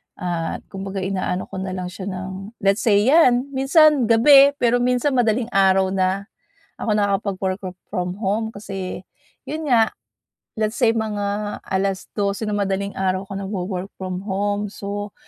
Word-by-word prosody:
At 170 -2 -3
kumbaga 195 0 -5
ina-ano 185 -1 -2
ko 190 - -7
na 190 0 -4
lang 180 -1 -5
siya 190 +1 -7
ng 190 +3 -6
let's 195 +2 +3
say 205 -3 +4
'yan, 260 -1 +4
minsan 275 0 +4
gabi 275 +5 +7
pero 245 -2 +2
minsan 250 +3 +1
madaling 240 -1 +1
araw 190 -1 +3
na 190 +1 0 0.5
ako 230 - -3
nakakapag-work 195 -2 0
fo 185 - -4 0.2
from 180 -3 -2
home 220 +2 -1
kasi 195 -3 -6 0.5
'yon 310 +2 -4
nga, 225 -3 +4 0.7
let's 215 +1 -1
say 235 -4 +4
mga 210 -1 -2
12:00 195 +2 -2
ng 210 - -1
madaling 200 0 -2
araw 190 0 0
ako - - -5
nag-wo-work 190 -1 -4
from 185 0 -4
home. 205 +1 -1
So 205 0 -5
200 Hz, 150 wpm, -21 LUFS, 190-225 Hz, 0.7 s, gabi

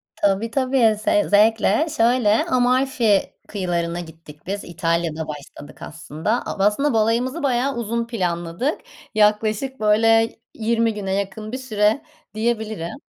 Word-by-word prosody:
Tabii, 205 +3 0
tabii 255 -4 +2
ze 205 - +3
zevkle. 220 +7 +3
Şöyle 230 -2 +3
Amalfi 250 -4 +2
kıyılarına 175 -4 -2
gittik 160 -3 -12
biz, 200 +1 -3
İtalya'da 165 -2 -2
başladık 145 -1 -10
aslında. 165 +7 -3
Ab 195 - -2
aslında 250 +8 +2
balayımızı 235 +7 0
bayağı 265 0 +1
uzun 235 0 -2
planladık. 180 - -2 0.3
Yaklaşık 215 +5 +1
böyle 225 +2 +3 0.2
20 230 0 0
güne 195 -2 -3
yakın 200 +2 -4
bir 255 - -3
süre 220 -2 +1 0.3
diyebilirim. 220 -6 -2
215 Hz, 120 wpm, -21 LUFS, 190-235 Hz, 0.3 s, ze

